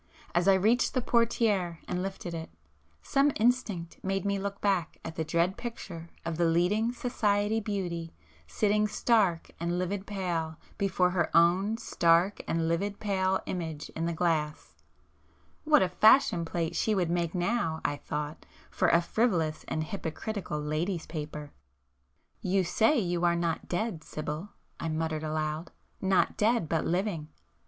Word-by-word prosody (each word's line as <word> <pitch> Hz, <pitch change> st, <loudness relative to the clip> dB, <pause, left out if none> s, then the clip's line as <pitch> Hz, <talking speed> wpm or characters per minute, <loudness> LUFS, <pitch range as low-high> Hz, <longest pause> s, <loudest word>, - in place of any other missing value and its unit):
As 175 Hz, +2 st, +2 dB
I 195 Hz, -, +7 dB
reached 220 Hz, +9 st, +2 dB
the 255 Hz, -, +2 dB
portiére 215 Hz, -8 st, +2 dB
and 180 Hz, -, -2 dB
lifted 190 Hz, -2 st, -5 dB
it, 165 Hz, -1 st, -5 dB, 0.5 s
some 280 Hz, +1 st, +3 dB
instinct 215 Hz, -7 st, 0 dB
made 195 Hz, 0 st, -1 dB
me 200 Hz, 0 st, 0 dB
look 200 Hz, 0 st, -4 dB
back 190 Hz, -5 st, 0 dB
at 165 Hz, -, -6 dB
the 160 Hz, -, -1 dB
dread 170 Hz, +4 st, +1 dB
picture 180 Hz, -8 st, -7 dB, 0.2 s
of 165 Hz, -1 st, -2 dB
the 170 Hz, -, +3 dB
leading 180 Hz, +8 st, +2 dB
"society" 215 Hz, -3 st, 0 dB
beauty 175 Hz, -6 st, -3 dB, 0.4 s
sitting 210 Hz, -, +2 dB
stark 205 Hz, -6 st, +2 dB
and 170 Hz, +1 st, -1 dB
livid 190 Hz, +2 st, -2 dB
pale 170 Hz, -6 st, -2 dB, 0.2 s
before 185 Hz, -2 st, +2 dB
her 175 Hz, -2 st, +1 dB
own 185 Hz, +6 st, +4 dB
stark 170 Hz, -1 st, +2 dB
and 165 Hz, 0 st, 0 dB
livid 200 Hz, +5 st, -1 dB
pale 190 Hz, -2 st, +1 dB
image 160 Hz, -4 st, -4 dB
in 165 Hz, +1 st, -2 dB
the -, -, 0 dB
glass,—what 165 Hz, -, -2 dB
a 185 Hz, -, 0 dB
"fashion 215 Hz, -3 st, +5 dB
plate" 165 Hz, 0 st, -2 dB
she 220 Hz, -, +1 dB
would 175 Hz, -3 st, +1 dB
make 170 Hz, 0 st, -1 dB
now, 175 Hz, -3 st, 0 dB
I 145 Hz, -, 0 dB
thought, 150 Hz, +1 st, -5 dB, 0.2 s
for -, -, +2 dB
a 170 Hz, -, +5 dB
frivolous 170 Hz, -8 st, 0 dB
and 155 Hz, -, -1 dB
hypocritical 180 Hz, 0 st, -4 dB
"ladies' 155 Hz, +4 st, -2 dB
paper!" 150 Hz, -2 st, -6 dB, 0.9 s
"You 190 Hz, +1 st, +2 dB
say 220 Hz, -, +3 dB
you 175 Hz, -5 st, 0 dB
are 170 Hz, 0 st, +4 dB
not 170 Hz, -1 st, -1 dB
dead, 180 Hz, -3 st, -2 dB
Sibyl!" 155 Hz, +6 st, -5 dB, 0.3 s
I 165 Hz, -, -2 dB
muttered 160 Hz, 0 st, -2 dB
aloud—"Not 155 Hz, +5 st, -1 dB
dead, 225 Hz, -4 st, +2 dB
but 160 Hz, 0 st, 0 dB
living! 175 Hz, -3 st, -1 dB
180 Hz, 145 wpm, -29 LUFS, 165-205 Hz, 0.9 s, I